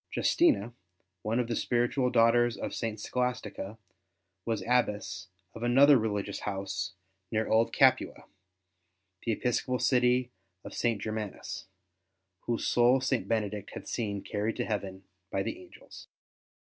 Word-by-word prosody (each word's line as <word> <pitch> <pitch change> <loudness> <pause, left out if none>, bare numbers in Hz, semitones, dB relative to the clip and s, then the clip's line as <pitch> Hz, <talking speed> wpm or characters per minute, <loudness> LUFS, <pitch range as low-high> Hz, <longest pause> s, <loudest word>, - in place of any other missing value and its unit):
Justina, 320 - +2 0.5
one 110 +5 0
of 120 - 0
the 115 - -1
spiritual 120 +2 +1
daughters 120 -1 +4
of - - -4
St. 110 -2 -3
Scholastica, 125 -4 -3 0.7
was 110 -4 -1
Abbess 105 -6 0 0.3
of 115 - -9
another 135 +4 +6
religious 105 -4 -1
house 95 -2 -3 0.4
near 110 0 0
Old 115 +1 +3
Capua, - - +3 1.0
the 115 - -1
episcopal 125 +2 0
city 125 -1 +2 0.3
of - - -9
St. 115 -3 0
Germanus, 110 -3 -5 0.8
whose 120 -1 -1
soul 120 +2 +4
St. 130 -1 -1
Benedict 105 -3 -2
had - - -8
seen 100 -4 -3
carried 105 +2 -2
to - - -2
heaven 95 -3 -4 0.3
by 95 - -1
the 355 - -5
angels. 360 - -14
115 Hz, 130 wpm, -30 LUFS, 105-125 Hz, 1.0 s, another